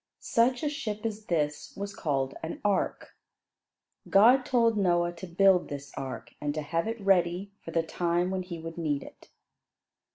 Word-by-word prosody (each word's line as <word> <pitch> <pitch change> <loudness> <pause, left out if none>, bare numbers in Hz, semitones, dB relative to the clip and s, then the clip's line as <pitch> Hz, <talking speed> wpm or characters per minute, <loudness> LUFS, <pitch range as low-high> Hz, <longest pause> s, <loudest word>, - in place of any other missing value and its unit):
Such 245 +3 +2
a - - +1
ship 230 -8 -4
as 215 -1 -3
this 150 -3 -1
was 200 0 -4
called 135 -3 -1
"an 160 - -5
ark." 205 -2 0 0.9
God 245 +6 +6
told 230 -3 +3
Noah 175 -3 +2
to 175 +2 -9
build 185 +1 +4
this 140 -1 -7
ark, 130 -3 -6
and 145 0 -2
to 155 - -2
have 165 +5 -1
it 225 +1 -3
ready 190 0 +2
for - - -8
the 165 0 +1
time 175 +2 0
when 190 -1 -1
he 180 -2 -6
would 165 +1 -7
need 145 -4 -1
it. - - -15
175 Hz, 170 wpm, -29 LUFS, 160-205 Hz, 0.9 s, God